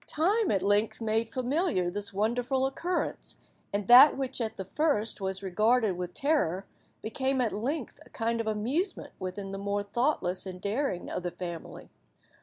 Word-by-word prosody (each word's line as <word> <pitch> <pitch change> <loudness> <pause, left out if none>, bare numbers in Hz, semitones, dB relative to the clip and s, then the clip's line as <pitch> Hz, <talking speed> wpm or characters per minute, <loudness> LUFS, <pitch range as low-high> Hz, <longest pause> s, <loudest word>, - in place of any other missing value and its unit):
Time 395 +7 +1
at 195 -2 +1
length 205 +2 +2
made 225 0 0
familiar 255 - 0
this 205 +2 -1
wonderful 240 +6 0
occurrence, 340 +7 -2 0.3
and 200 -1 -2
that 260 +4 +9
which 265 -2 -3
at 220 -1 -3
the 190 - -5
first 225 - 0
was 190 0 -3
regarded 215 +2 +2
with 180 0 -5
terror, 200 - +1 0.4
became 265 +4 -1
at 240 -3 +1
length 260 +6 -3
a - - -19
kind 230 0 -1
of 225 - -6
amusement 255 - -1
with 185 -1 -4
the 200 - -5
more 200 0 -1
thoughtless 200 -4 0
and 185 -1 -7
daring 205 -1 -2
of - - -2
the 175 - -2
family. 170 -2 -8
220 Hz, 165 wpm, -29 LUFS, 195-265 Hz, 0.4 s, that